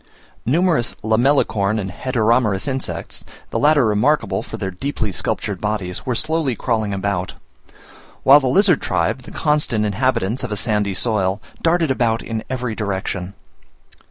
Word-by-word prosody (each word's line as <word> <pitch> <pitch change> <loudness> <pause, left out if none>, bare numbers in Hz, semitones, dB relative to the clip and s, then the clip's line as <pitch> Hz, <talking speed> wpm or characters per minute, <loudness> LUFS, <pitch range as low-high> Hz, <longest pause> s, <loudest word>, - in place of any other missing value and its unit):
Numerous 160 -2 +2
Lamellicorn 110 -3 +2
and 95 -3 -3
Heteromerous 115 -1 +1
insects, 135 -1 -4 0.3
the - - -1
latter 145 -3 +4
remarkable 110 +8 +1
for - - -8
their 95 - -3
deeply 110 +1 -3
sculptured 90 - -2
bodies, 105 -3 -3
were 125 - 0
slowly 155 -2 0
crawling 110 -3 -1
about; 100 -2 -2 0.9
while 140 +2 +8
the 135 - -1
lizard 180 +4 +3
tribe, 90 +7 0
the 125 - -12
constant 150 -8 +1
inhabitants 110 +1 0
of - - -4
a - - 0
sandy 105 -3 0
soil, 100 -3 +1 0.2
darted 165 -3 +2
about 115 -3 +1
in 110 -1 -4
every 125 -3 -2
direction. 95 -3 -3
115 Hz, 140 wpm, -20 LUFS, 100-135 Hz, 0.9 s, while